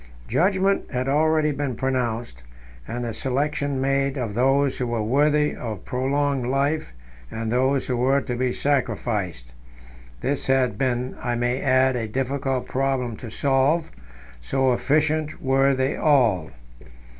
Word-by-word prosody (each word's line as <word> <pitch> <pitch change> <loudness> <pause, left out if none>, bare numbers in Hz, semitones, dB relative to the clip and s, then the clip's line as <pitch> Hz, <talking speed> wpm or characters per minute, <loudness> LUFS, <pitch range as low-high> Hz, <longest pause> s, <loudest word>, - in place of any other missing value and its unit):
Judgment 195 +2 +1
had 125 0 -2
already 155 +2 +2
been 140 -3 -3
pronounced, 120 - -2 0.5
and 120 0 -4
the 115 - -3
selection 140 +2 -1
made 135 +1 0
of 115 -5 -3
those 135 +4 +2
who 125 - -1
were 115 -2 -1
worthy 150 +5 +2
of 110 -5 -6
prolonged 135 0 0
life 140 +4 0 0.4
and 110 0 -4
those 130 +2 +1
who 125 - -1
were 130 +3 +2
to 125 -3 -4
be 125 +1 0
sacrificed. 105 - -2 0.7
This 140 0 -1
had 130 -4 +2
been, 125 +1 -1
I 120 -1 -1
may 120 +2 -1
add, 130 -1 +3
a 115 -2 -2
difficult 135 +2 -2
problem 130 -3 -1
to 120 - -8
solve, 140 +7 +1 0.5
so 130 - +1
efficient 150 +3 0
were 135 0 +2
they 130 +2 0
all. 120 - +2
130 Hz, 140 wpm, -23 LUFS, 120-140 Hz, 0.7 s, add